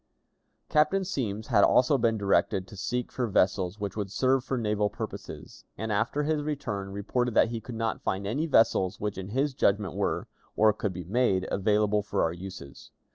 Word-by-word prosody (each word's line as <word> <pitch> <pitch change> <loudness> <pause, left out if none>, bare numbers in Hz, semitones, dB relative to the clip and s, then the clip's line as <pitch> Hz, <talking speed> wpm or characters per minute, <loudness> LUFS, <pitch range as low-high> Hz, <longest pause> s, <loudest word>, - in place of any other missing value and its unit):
Captain 190 +6 +2
Semmes 110 - -3
had 100 - +5
also 130 +3 +4
been 115 -3 +2
directed 100 -2 +1
to 105 - -12
seek 125 +5 -3
for 125 -2 -1
vessels 95 -1 +1
which 100 -1 -4
would 105 -2 -3
serve 130 +5 +2
for 130 0 -2
naval 105 -2 0
purposes, - - -8
and, 110 0 -3
after 115 +8 0
his 155 0 0
return, 105 -10 -3
reported 110 +4 -2
that - - +5
he 115 -1 -4
could 120 - -8
not 115 0 -2
find 95 +1 -2
any 140 +11 -1
vessels 105 - +3
which 105 -2 -3
in 95 - -6
his 135 +5 0
judgment 100 - +1
were, - - -1 0.3
or 110 0 +5
could 100 -1 -2
be 90 0 -6
made, 95 -1 +1
available 105 +1 +2
for 105 - -1
our 80 - 0
uses. 90 -5 -10
105 Hz, 185 wpm, -28 LUFS, 100-125 Hz, 0.3 s, had